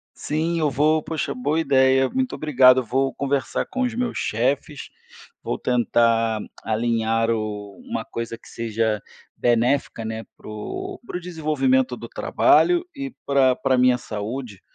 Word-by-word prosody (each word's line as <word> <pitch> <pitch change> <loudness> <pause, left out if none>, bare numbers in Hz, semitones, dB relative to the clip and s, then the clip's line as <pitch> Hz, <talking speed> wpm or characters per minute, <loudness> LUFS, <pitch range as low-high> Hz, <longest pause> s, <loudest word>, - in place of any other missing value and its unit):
Sim, 165 +3 -1
eu 155 -2 +1
vou, 150 +4 +2
poxa, 160 -1 -3
boa 145 +5 -1
ideia, 130 -3 +4
muito 260 -1 -1
obrigado. 130 -4 +5
Vou 135 +3 0
conversar 140 -1 -1
com 260 - -3
os 245 -3 -1
meus 245 0 -2
chefes, 135 +6 -1 0.5
vou - - -2
tentar 115 -2 +2 0.2
alinhar 115 0 0
o 105 -3 -3
uma - - -4
coisa 115 0 -5
que - - -18
seja 110 -2 -1 0.4
benéfica, 120 0 +1
né. 110 0 -5
Para - - -13
o 370 - -6
para - - -5
o - - -4
desenvolvimento 180 - 0
do - - -9
trabalho. 350 0 +3
E 275 -3 -6
pra 135 -2 +3
pra 135 0 +1
a - - 0
minha 125 0 +5
saúde, 110 -1 -6
130 Hz, 150 wpm, -23 LUFS, 115-155 Hz, 0.5 s, obrigado